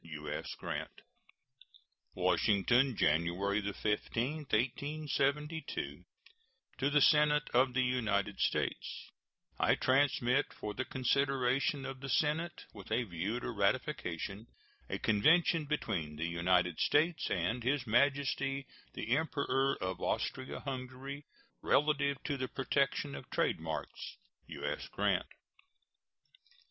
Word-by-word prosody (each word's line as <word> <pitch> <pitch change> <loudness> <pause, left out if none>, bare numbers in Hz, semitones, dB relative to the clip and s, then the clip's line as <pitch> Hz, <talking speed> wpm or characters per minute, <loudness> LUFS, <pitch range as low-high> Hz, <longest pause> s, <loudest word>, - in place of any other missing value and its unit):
U.S. 75 -2 -5
GRANT. - - -5 1.1
WASHINGTON, 120 +5 +3
January 85 +7 +1
15, 110 +7 -1
1872. 145 +4 -1 0.7
To 135 +2 +2
the 150 +1 +4
Senate 150 0 +5
of 125 +1 +3
the 130 - +3
United 115 -6 0
States: - - -2 0.5
I - - +4
transmit, 135 0 +2
for 105 - -5
the 130 - -3
consideration 135 +1 +1
of 135 -1 -6
the 135 +1 -6
Senate 160 +6 0
with 100 0 -11
a 120 +3 +2
view 100 +4 -3
to - - -3
ratification, 100 - -1 0.4
a - - -2
convention 160 +9 +3
between 90 - -2
the 80 +2 -3
United 85 0 +1
States 160 +3 +2
and 100 +7 -1
His 130 0 +1
Majesty 135 +2 +1 0.3
the 120 +4 0
Emperor 135 -3 +1
of 95 -1 -3
Austria 130 0 -2
Hungary, 135 +1 -6 0.4
relative 140 -1 +2
to 145 -2 -2
the 130 -1 -2
protection 140 +2 0
of - - -8
trade - - +1
marks. - - -5 0.3
U.S. - - -4
GRANT. - - 0
130 Hz, 110 wpm, -33 LUFS, 105-140 Hz, 1.1 s, Senate